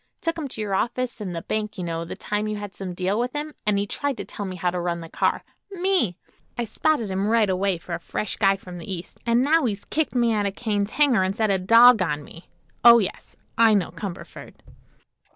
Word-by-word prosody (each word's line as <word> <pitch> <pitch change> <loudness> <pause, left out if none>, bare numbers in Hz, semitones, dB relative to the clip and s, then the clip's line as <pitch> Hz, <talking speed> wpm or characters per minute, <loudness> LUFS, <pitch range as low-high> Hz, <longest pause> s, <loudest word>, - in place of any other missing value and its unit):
Took 330 0 -1
him 300 - -3
to 230 - -6
your 205 -2 -2
office 240 +3 -1
and 185 -4 -4
the 165 - -5
bank, 215 -1 -3
you 180 - -4
know, 165 -1 -3
the - - -7
time 210 +1 -2
you 215 - -2
had 205 -1 -7
some 185 -2 -6
deal 190 +4 0
with 245 +3 -2
him; 300 +1 -4
and 210 -1 +3
he 200 - 0
tried 280 +5 -3
to - - -5
tell 205 -2 -6
me 185 - -5
how 180 0 -1
to 180 - -3
run 175 -1 -2
the 165 - -9
car. - - 0 0.3
Me! 365 - +1 0.4
I 240 - -1
spotted 230 -1 0
him 190 +2 -1
right 220 -3 +3
away 185 0 0
for 170 +1 -8
a 170 - -2
fresh 205 +4 -3
guy 195 -2 +3
from 180 -2 -10
the 170 - -8
East, 175 -2 -7
an' 235 +2 +3
now 310 +1 +3
he's 205 -4 -3
kicked 305 -4 -1
me 235 -2 +3
out 205 -2 +1
of 195 - -5
Kane's 205 -3 -1
hangar 265 -7 +3
an' 190 +1 0
set 215 -1 +1
a 190 - +2
dog 230 +4 +7
on 150 -4 -1
me. 165 +4 -14 0.3
Oh, 235 0 +10
yes; 205 -5 -3 0.2
I 225 -2 +6
know 195 -4 0
Cumberford." 195 -4 -8
205 Hz, 240 wpm, -24 LUFS, 185-235 Hz, 0.4 s, Oh